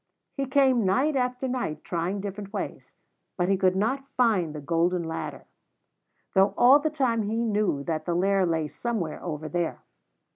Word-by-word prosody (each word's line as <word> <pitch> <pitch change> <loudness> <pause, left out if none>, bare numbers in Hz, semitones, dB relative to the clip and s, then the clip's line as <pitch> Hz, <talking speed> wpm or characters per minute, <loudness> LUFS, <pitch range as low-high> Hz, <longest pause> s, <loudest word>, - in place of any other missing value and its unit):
He 275 -2 -3
came 265 -3 +3
night 260 +11 +2
after 250 0 -1
night, 245 -12 -3
trying 180 +3 -2
different 200 0 -6
ways; 205 - -6 0.4
but 180 0 +1
he 195 - +4
could 185 -1 +2
not 265 +8 -1
find 200 -11 +2
the - - -4
golden 170 +4 0
ladder, 165 0 -5 0.9
though 195 0 +3
all 260 +4 +7
the 310 +1 0
time 260 -7 0
he 215 +1 -2
knew 205 -10 0
that 155 0 -3
the 175 - -1
Lair 195 +2 +2
lay 160 -2 0
somewhere 200 -3 -4
over 155 -3 -4
there. 170 0 -2
195 Hz, 170 wpm, -26 LUFS, 170-250 Hz, 0.9 s, all